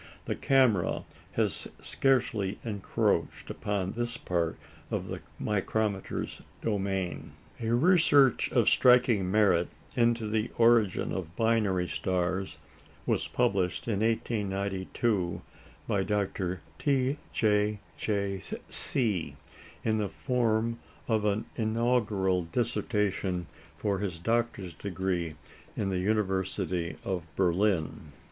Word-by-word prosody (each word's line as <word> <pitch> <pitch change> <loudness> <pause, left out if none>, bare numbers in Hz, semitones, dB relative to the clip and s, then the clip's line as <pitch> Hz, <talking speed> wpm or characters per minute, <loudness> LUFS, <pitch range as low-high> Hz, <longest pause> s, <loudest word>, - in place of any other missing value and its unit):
The - - -1
camera 125 -10 +3 0.3
has - - 0
scarcely 115 -7 +1
encroached 105 -4 -1
upon 100 -2 -2
this 120 +1 -2
part 85 -2 -1 0.3
of - - -3
the - - -5 0.2
micrometer's 105 -1 -1 0.2
domain. 95 -4 -2 0.3
A 115 -1 -1
research 145 -3 +4
of - - +3
striking 125 -6 +5
merit 95 -4 +4 0.3
into 115 -2 +2
the 110 +2 0
origin 115 -4 +4
of 85 -3 -4
binary 105 -6 +2
stars 90 +3 -1 0.5
was - - 0
published 95 0 0
in 105 -4 0
1892 100 -3 -1 0.4
by 95 -2 +1
Dr. 95 -3 -1 0.2
T. 135 0 +1
J. 105 -1 +2 0.2
J. 100 -2 -1 0.3
See, 95 - 0 0.5
in 110 -1 +1
the 105 -2 -1
form 115 0 0 0.3
of 110 -2 +1
an 105 +1 +1
Inaugural 110 -5 +1
Dissertation 105 -5 0 0.3
for 100 -2 0
his 95 -4 -3
doctor's 115 -2 -1
degree 90 -3 -2 0.4
in 100 -2 0
the 90 - 0
University 95 -3 -1
of 90 -3 -2
Berlin. 90 -5 +1
100 Hz, 105 wpm, -29 LUFS, 95-115 Hz, 0.5 s, striking